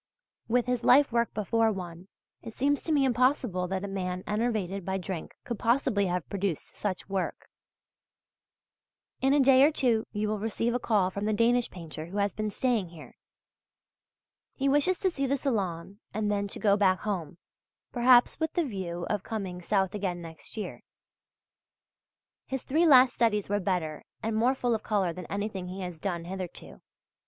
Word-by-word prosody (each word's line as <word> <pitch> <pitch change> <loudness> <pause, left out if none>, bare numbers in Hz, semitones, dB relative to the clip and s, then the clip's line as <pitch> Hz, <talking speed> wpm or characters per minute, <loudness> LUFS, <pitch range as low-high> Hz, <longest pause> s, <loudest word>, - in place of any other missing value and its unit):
With 245 +1 +2
his 250 -1 -1
life 275 +2 +6
work 235 0 +1
before 220 +2 +2
one, 180 -2 -7 0.3
it 225 -2 -9
seems 285 +2 +1
to 325 - -3
me 285 -3 +4
impossible 250 -7 +1
that 190 +1 -3
a - - -3
man 185 -2 -3
enervated 210 -3 -1
by 190 +2 -2
drink 185 -3 -6
could 235 -3 -5
possibly 230 -5 +2
have 180 -2 -2
produced 195 -5 -3
such 195 -3 -3
work. 195 -1 -3 1.7
In 270 - +3
a 290 - +4
day 265 -1 +6
or 290 - +7
two 240 -7 +1
you 210 0 -1
will 215 0 -1
receive 225 +2 -1
a 245 - 0
call 205 -6 +1
from 200 +2 -4
the 215 - +1
Danish 235 +3 +2
painter 165 -3 -8
who 195 +4 -6
has 200 0 +1
been 215 0 -2
staying 220 -4 0
here. 165 -2 -12 1.4
He 275 - 0
wishes 290 +7 +4
to 375 - +2
see 275 -4 -1
the 280 +2 +1
Salon 195 - -2 0.2
and 210 -1 0
then 200 0 0
to - - -7
go 200 -2 +4
back 190 -2 +2
home, 175 -7 -3 0.5
perhaps 245 +2 +5
with 320 -1 -1
the 345 -3 +1
view 180 -7 -4
of 210 -2 -1
coming 195 -5 -5
South 190 0 +1
again 190 -4 -2
next 165 +4 -11
year. 215 - -5 1.7
His 265 -1 -4
three 325 +5 +2
last 255 -3 +7
studies 210 -4 +1
were 205 0 +1
better 175 -6 -2 0.2
and 220 0 -1
more 245 +4 +3
full 245 -2 0
of 220 - -1
colour 195 -6 0
than 180 +1 -8
anything 200 -2 -4
he 185 +2 -6
has 180 -3 -6
done 170 -2 -3
hitherto. 185 -1 -7
210 Hz, 180 wpm, -28 LUFS, 185-245 Hz, 1.7 s, or